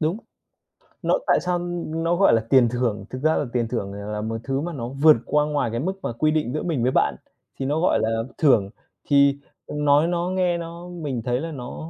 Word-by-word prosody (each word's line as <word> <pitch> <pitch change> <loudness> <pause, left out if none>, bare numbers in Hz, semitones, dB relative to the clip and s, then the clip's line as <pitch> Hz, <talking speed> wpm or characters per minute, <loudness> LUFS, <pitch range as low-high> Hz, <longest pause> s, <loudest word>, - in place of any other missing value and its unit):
Đúng. 160 +4 0 0.9
Nó - - +2
tại - - +4
sao 180 0 -1 0.3
nó 165 +2 0
gọi 195 -7 +4
là 115 - +3
tiền 130 -3 +5
thưởng? 115 -4 -2
Thực 130 - -6
ra 155 +2 +3
là - - 0
tiền 120 -2 0
thưởng 105 -5 -3
này 100 +1 -7
là 105 0 -3
một 110 +1 -3
thứ 135 +1 -1
mà 170 +2 -4
nó 120 -5 -5
vượt 145 +1 +5
qua 150 0 +2
ngoài 145 -5 -1
cái 115 - -2
mức 180 +9 -1
mà - - -2
quy 155 +6 +1
định 150 -5 -1
giữa 155 - -2
mình 155 -9 -1
với 125 - +2
bạn, - - +2 0.4
thì 135 - -2
nó 145 +3 0
gọi 180 - +2
là 115 0 0
thưởng. 115 -10 +3 0.4
Thì 140 -1 +5 0.3
nói 150 +1 +2
nó 175 0 -1
nghe 180 -2 +1
nó 170 +1 -8
mình 150 -9 -4
thấy 125 0 0
là 165 +3 -5
nó 140 +3 -7
145 Hz, 230 wpm, -23 LUFS, 120-165 Hz, 0.9 s, tiền